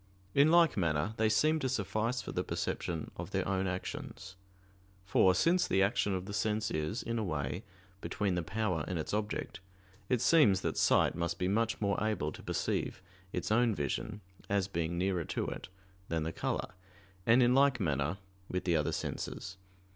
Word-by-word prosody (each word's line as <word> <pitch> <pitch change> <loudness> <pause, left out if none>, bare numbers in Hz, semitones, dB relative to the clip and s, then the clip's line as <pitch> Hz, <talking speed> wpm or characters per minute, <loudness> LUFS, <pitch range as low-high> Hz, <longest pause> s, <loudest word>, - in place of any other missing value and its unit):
In 140 +2 +5
like 170 0 +5
manner 80 +2 +1
they 110 -1 +3
seem 155 +8 +3
to 135 -3 -1
suffice 115 +3 -1
for - - -6
the - - -1
perception 85 -3 -3
of - - -5
their - - -1
own 95 -1 0
actions; 95 0 -5 0.7
for 95 0 +4
since 175 +2 +3
the 95 - +3
action 100 -1 +1
of 90 0 -4
the 100 - -6
sense 105 +1 0
is, 80 +10 -2
in 115 0 -2
a - - -1
way, 80 -1 -2 0.4
between 100 -3 -1
the 90 - 0
power 90 -2 -1
and 90 - -2
its 80 - -4
object, 105 -2 -2 0.5
it 125 - +2
seems 115 - +5
that - - -1
sight - - +4
must 85 0 -2
be 90 - 0
much 110 +4 +1
more 100 0 0
able 105 -9 0
to - - -10
perceive - - -2 0.3
its - - -3
own 115 -1 +3
vision, 105 +9 -3 0.3
as 100 -2 +1
being 85 -2 -2
nearer 90 -1 0
to - - -2
it, - - -6 0.4
than 80 -1 0
the 80 +1 -3
color; - - -2 0.6
and 120 +3 +6
in 120 +1 +4
like 135 -2 +4
manner 75 -1 0 0.3
with 90 - -2
the 85 -2 +2
other 75 -2 +1
senses. 95 0 -4
100 Hz, 185 wpm, -32 LUFS, 85-115 Hz, 0.7 s, and